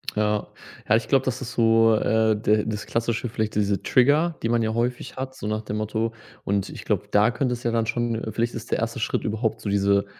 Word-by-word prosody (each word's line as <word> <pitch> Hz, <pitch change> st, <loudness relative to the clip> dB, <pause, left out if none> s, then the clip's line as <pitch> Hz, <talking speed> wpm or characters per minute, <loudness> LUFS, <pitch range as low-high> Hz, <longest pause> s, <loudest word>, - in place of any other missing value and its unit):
Ja. 105 Hz, -1 st, 0 dB, 0.4 s
Ja, 105 Hz, -, +5 dB
ich 115 Hz, -, 0 dB
glaube, 135 Hz, -1 st, +3 dB
das 130 Hz, -1 st, -1 dB
ist 125 Hz, -1 st, -5 dB
so, 115 Hz, -1 st, +4 dB
äh, 110 Hz, 0 st, +2 dB
de 105 Hz, 0 st, +1 dB
das 105 Hz, -1 st, -4 dB
Klassische 115 Hz, +1 st, -1 dB
vielleicht, 110 Hz, -1 st, -2 dB
diese 100 Hz, -2 st, +1 dB
Trigger, 150 Hz, -, +3 dB
die 115 Hz, -, -1 dB
man 120 Hz, 0 st, +2 dB
ja 110 Hz, 0 st, -1 dB
häufig 120 Hz, +2 st, -2 dB
hat, 130 Hz, 0 st, -5 dB
so 130 Hz, -, -8 dB
nach 110 Hz, 0 st, -1 dB
dem 105 Hz, -1 st, -4 dB
Motto 110 Hz, +1 st, -2 dB, 0.3 s
und 100 Hz, -1 st, 0 dB
ich -, -, -8 dB
glaube, -, -, -1 dB
da 105 Hz, +2 st, +4 dB
könnte 125 Hz, +1 st, -1 dB
es 120 Hz, -, -6 dB
ja 120 Hz, -, +1 dB
dann 115 Hz, -1 st, +1 dB
schon 120 Hz, +1 st, -1 dB
äh, 110 Hz, 0 st, -4 dB
vielleicht 115 Hz, +2 st, -1 dB
ist 115 Hz, -, -8 dB
der -, -, +1 dB
erste 115 Hz, +2 st, -2 dB
Schritt 110 Hz, -, -1 dB
überhaupt 110 Hz, +1 st, -2 dB
so 105 Hz, -, -3 dB
diese 100 Hz, 0 st, +2 dB
115 Hz, 240 wpm, -24 LUFS, 105-120 Hz, 0.4 s, Ja